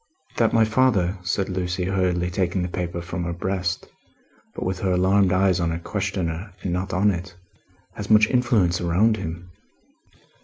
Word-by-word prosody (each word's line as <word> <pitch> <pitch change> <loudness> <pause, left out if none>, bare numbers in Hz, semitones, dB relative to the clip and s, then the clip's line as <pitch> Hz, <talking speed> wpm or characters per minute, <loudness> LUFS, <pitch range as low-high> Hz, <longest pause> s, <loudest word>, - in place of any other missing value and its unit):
"That 115 -2 +3
my 115 -1 +4
father," 110 -6 +2
said 95 +1 -1
Lucie, 90 -1 -2
hurriedly 90 -1 0
taking 90 0 0
the - - -1
paper 85 -1 -4
from 85 0 -4
her 85 - -2
breast, 90 0 -2 0.7
but - - -4
with 95 0 -2
her 95 -1 0
alarmed 95 +1 +3
eyes 95 -1 +3
on 85 -1 0
her 85 - -2
questioner 95 0 -3
and 90 - -1
not 90 +1 -2
on 100 +3 +3
it, 90 0 -6 0.6
"has - - -7
much 110 0 +6
influence 110 -9 +2
around 95 +6 +2
him." 85 +1 -6
90 Hz, 165 wpm, -23 LUFS, 90-100 Hz, 0.7 s, much